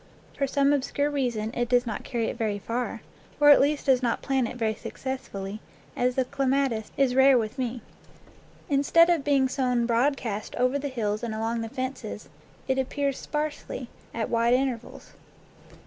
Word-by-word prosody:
For 275 - 0
some 280 +1 +3
obscure 285 +1 0
reason 240 -6 -1
it 240 0 -1
does 245 0 +3
not 225 -3 -4
carry 235 -2 -2
it - - -3
very 220 -4 -1
far, 235 +4 -4 0.4
or 290 0 +8
at 285 - +7
least 290 +1 +1
does 265 -2 +4
not 240 -2 -1
plant 265 -3 +1
it - - -7
very 220 -2 0
successfully, 215 -4 -6 0.4
as 250 0 +1
the 260 - +1
clematis 270 -4 0
is 270 -2 +3
rare 265 0 +6
with 225 +3 -3
me. 245 -2 -3 0.8
Instead 320 +5 +4
of 330 -5 +1
being 275 -2 +3
sown 250 -2 0
broadcast 235 -3 0
over 255 +3 +1
the 285 - -3
hills 215 -5 -2
and 230 -2 -3
along 225 +1 -1
the 225 - -4
fences, 260 +1 -5 0.4
it 265 0 +1
appears 275 +1 -1
sparsely, 295 -4 -4 0.2
at 225 -1 -2
wide 235 +1 +3
intervals. 255 -3 -3
255 Hz, 170 wpm, -26 LUFS, 230-275 Hz, 0.8 s, or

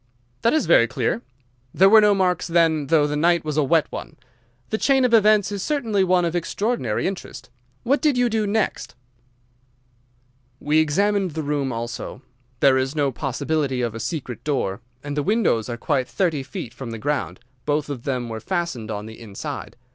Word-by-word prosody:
"That 230 - +3
is 315 - +1
very 140 -8 +5
clear. 120 -1 -1 0.5
There 190 - +6
were 220 +2 +8
no 210 -1 +4
marks, 180 -2 +1
then, 165 -4 +2
though 155 0 +4
the 150 0 -2
night 170 +1 +2
was 150 -2 -2
a 150 - +3
wet 160 +2 +3
one? - - -7 0.6
The 220 - 0
chain 270 -2 +3
of 245 - +1
events 215 -2 +5
is 200 -1 -3
certainly 225 -7 0
one 180 -1 +3
of 170 0 -2
extraordinary 175 - -1
interest. 190 -8 -6 0.3
What 275 +4 +1
did 295 -5 +2
you 245 0 +3
do 220 -2 0
next? 210 - -1 1.6
"We 150 +1 +2
examined 190 +3 +1
the 160 - -2
room 140 -2 -1
also. 120 +2 -6 0.4
There 130 -1 +5
is 135 +3 -2
no 145 -3 +1
possibility 135 0 -1
of 115 -2 -2
a 115 - -6
secret 125 +1 -5
door, 120 -8 -1 0.2
and 145 0 -4
the 150 - +1
windows 185 - +1
are 120 - -4
quite 130 -1 0
thirty 170 -7 0
feet 125 -3 -7
from 125 -1 -7
the 115 - -5
ground. 145 +5 -2 0.3
Both 145 0 0
of 140 -5 -5
them 125 -4 -2
were 110 -1 -5
fastened 170 - -3
on 105 -1 -4
the 110 0 -10
inside. 105 -4 -7
155 Hz, 185 wpm, -22 LUFS, 130-195 Hz, 1.6 s, were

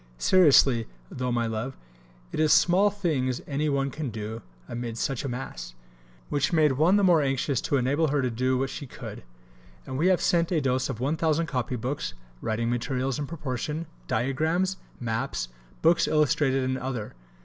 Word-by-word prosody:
Seriously 135 - +5 0.2
tho', 125 -1 -2
my 120 -1 +1
love, 115 +4 -3 0.5
it - - -4
is 155 -1 +3
small 190 +4 +5
things 150 -11 -1
any 150 +1 -1
one 140 -1 0
can 150 -2 -4
do 110 +1 -5 0.3
amid 120 -1 -5
such 135 +3 -1
a 140 - -3
mass, - - -6 0.5
which 145 -1 0
made 155 -3 +4
one 155 +8 +3
the 205 - +3
more 175 -4 +5
anxious 135 -1 0
to 140 - +1
enable 140 +5 +2
her 140 -1 +1
to 125 - 0
do 130 +3 +1
what 135 +1 -1
she 140 - -6
could, - - -8 0.6
and 130 - -4
we 170 - +3
have 185 -1 +4
sent 170 0 +2
a 170 - +3
dose 130 -2 0
of 110 - -4
1000 160 +4 +1
copybooks, 125 - -3 0.3
writing 115 +1 -1
materials 125 +3 -1
in 145 - -3
proportion, 150 +1 -4 0.2
Diagrams, 160 +10 0 0.2
Maps, 110 - -2 0.3
books 170 - +4
illustrated 145 -3 +2
and 130 0 -1
other. 125 -5 -4
135 Hz, 170 wpm, -27 LUFS, 125-155 Hz, 0.6 s, Seriously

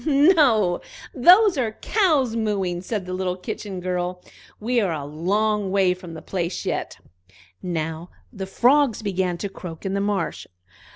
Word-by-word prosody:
"No, 280 - +4 0.3
those 360 - +6
are 225 -4 -1
cows 300 - +1
mooing!" 195 -6 -1
said 195 0 -4
the 185 - -5
little 185 -1 -2
Kitchen 190 +1 -6
girl. 180 0 -3 0.4
"We 240 +2 +1
are 195 -4 0
a 150 -3 -4
long 200 +7 0
way 190 -1 +3
from 180 -2 -10
the 160 - -9
place 175 -2 -3
yet." - - -3 0.6
Now 165 -1 -4 0.2
the 195 -3 -6
frogs 250 +3 +3
began 185 -3 -1
to 200 - -3
croak 175 -3 -9
in 195 - -2
the 200 - 0
marsh. 200 -3 -2
195 Hz, 155 wpm, -23 LUFS, 180-230 Hz, 0.6 s, those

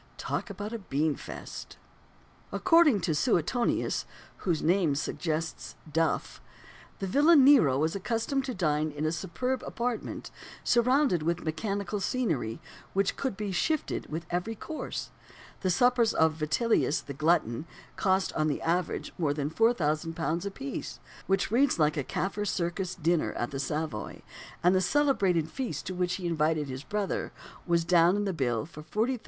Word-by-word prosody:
Talk - - -3
about 210 +2 -5
a 230 - -3
bean 155 -4 0
feast! - - -8 0.7
According 330 - +5
to 165 -2 0
Suetonius 225 - +1 0.3
(whose 170 -5 -1
name 170 -4 +3
suggests 160 +2 -3 0.2
"duff") 165 0 0 0.6
the 195 - -3
villain 290 - +6
Nero 245 - +6
was 160 +4 0
accustomed 230 +7 -1
to 255 -3 -4
dine 155 -4 +1
in 150 +1 -4
a 155 - +1
superb 195 +10 -2
apartment, 240 -1 -4 0.3
surrounded 250 - +3
with 170 +2 -1
mechanical 200 +5 -2
scenery, 165 - -1 0.3
which 195 0 +1
could 260 -8 -3
be 210 -2 -3
"shifted" 310 - -1
with 160 +2 -4
every 180 +6 -1
course. 315 +8 -5 0.5
The 185 - 0
suppers 245 +3 +3
of 160 -1 +4
"Vitellius 155 +2 +1
the 140 - -7
Glutton" 155 -2 +1 0.3
cost, 190 -1 +1
on 155 - +1
the 145 - -1
average, 175 +2 -1
more 145 -4 +1
than 145 0 -2
£4000 165 -4 +1
a - - -1
piece 270 +7 -6 0.3
which 195 +1 +1
reads 255 +1 +3
like 150 -2 +3
a 145 - -1
"Kaffir 200 +8 -2
Circus" 180 0 -2
dinner 170 -1 +1
at 120 - -3
the 135 - -4
Savoy 150 -6 -3 0.4
and 180 +1 +5
the 185 - +3
celebrated 190 - +2
feast 260 -3 -4
to 185 - -3
which 180 0 0
he 185 - -6
invited 155 -3 +1
his 130 0 -5
brother 205 +1 -2 0.4
was 170 -1 +2
down 175 +1 +5
in 205 0 0
the 195 - -1
bill 125 -5 0
for 155 -2 -11
£40,350. 230 +10 -1
180 Hz, 155 wpm, -29 LUFS, 155-220 Hz, 0.7 s, villain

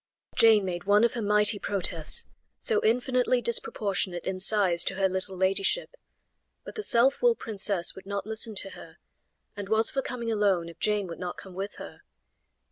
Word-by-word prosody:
Jane 220 -3 +5
made 175 -1 -4
one 205 +2 +4
of 235 - +2
her 240 - -4
mighty 210 0 +3
protests, 175 -6 -1 0.3
so 450 -3 0
infinitely 250 +2 +1
disproportionate 200 -6 -1
in 190 -1 -3
size 190 -4 +3
to 195 - -1
her 195 0 +2
little 190 0 0
ladyship, 195 - 0 0.7
but - - -9
the 435 - -5
self 265 - +2
willed 485 -1 +3
princess 200 -4 0
would 190 0 -13
not 200 0 -4
listen 220 0 -1
to 195 0 -2
her, - - -13 0.6
and 200 -1 -7
was 220 +1 +3
for 270 - -1
coming 235 -3 -4
alone 195 -6 +1
if 170 - -14
Jane 210 -2 0
would 170 -2 -8
not 180 -1 -5
come 190 - -11
with 195 +3 -6
her. - - -11
205 Hz, 180 wpm, -27 LUFS, 190-230 Hz, 0.7 s, Jane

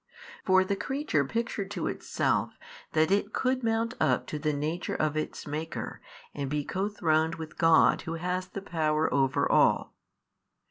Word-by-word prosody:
For 190 0 +5
the 200 +1 -1
creature 265 - 0
pictured 200 - -3
to - - -3
itself - - -1 0.4
that 160 +2 +3
it 200 +1 +1
could 255 0 0
mount 225 +1 0
up - - +2
to 150 - -2
the 155 +1 0
Nature 155 +4 -2
of 155 -1 0
its 155 - -3
Maker 155 +2 -5 0.3
and 140 -2 -3
be 145 0 -1
co 195 +2 -1
throned 160 -5 +1
with 160 -1 -8
God 165 -1 +5
Who 165 -1 -4
has 180 +2 -2
the 195 +1 -7
power 155 -3 0
over 135 -2 +2
all. - - +3
165 Hz, 165 wpm, -28 LUFS, 155-200 Hz, 0.4 s, For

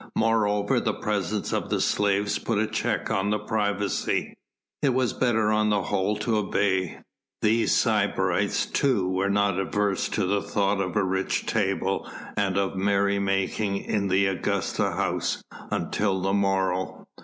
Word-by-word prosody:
Moreover 105 -2 +2
the - - -1
presence 105 -1 -2
of - - -1
the - - 0
slaves 100 0 +1
put 115 - -1
a 110 - +2
check - - -2
on 100 +1 +1 0.2
privacy. 105 -2 -1 0.5
It 135 -4 +2
was 130 -2 +1
better 110 -4 +1
on 110 0 +2
the 100 -2 +1
whole 95 +4 0
to 110 +1 0
obey. 95 -3 0 0.5
These 110 +1 +3
sybarites - - +1
too 120 -10 +1
were 95 +2 0
not 100 -1 +2
averse 100 0 0
to - - 0
the 100 +2 +1
thought 100 -1 0
of 90 +1 -3
a 105 - +3
rich 95 0 -1
table - - -1 0.3
and 95 -2 0
of 100 -1 0
merry 100 +1 +1
making 100 +1 0
in 100 0 -1
the 95 +1 +3
Augusta's 95 -1 -1
house - - -1 0.3
until 100 -2 0
the 95 +1 0
morrow. 95 -2 0
100 Hz, 150 wpm, -26 LUFS, 95-105 Hz, 0.5 s, These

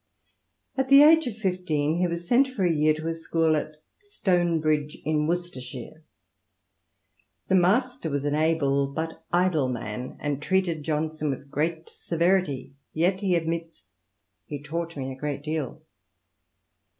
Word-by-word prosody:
* - - -43
At 265 0 0
the 275 +1 +9
age 320 -1 +6
of 220 -3 -5
fifteen 175 -6 0
he 180 - +2
was 170 0 -5
sent 260 +6 +4
for 235 -8 -2
a 170 - +3
year 155 0 +3
to 155 +1 -5
a 165 - 0
school 165 -1 +1
at 155 0 -4 0.2
Stonebridge 170 - 0
in 150 0 +1
Worcestershire. 160 -4 -5 1.5
The - - +2
master 215 - +2
was 145 -1 -2
an 145 - 0
able 150 -3 +2
but 160 +4 -5
idle 175 -6 +2
man, 125 0 -5
and 145 -1 -2
treated 180 -2 0
Johnson 155 0 -2
with 140 +1 -5
great 160 +2 -1
severity, 170 -5 0 0.2
yet, 180 +4 +1
he 190 -3 +2
admits, 165 0 -3 0.3
" 95 -2 -51
he 145 - -5
taught 165 +3 -5
me 135 -1 -4
a - - -7
great 145 0 -4
deal." 155 -3 -4
160 Hz, 150 wpm, -26 LUFS, 145-180 Hz, 1.5 s, the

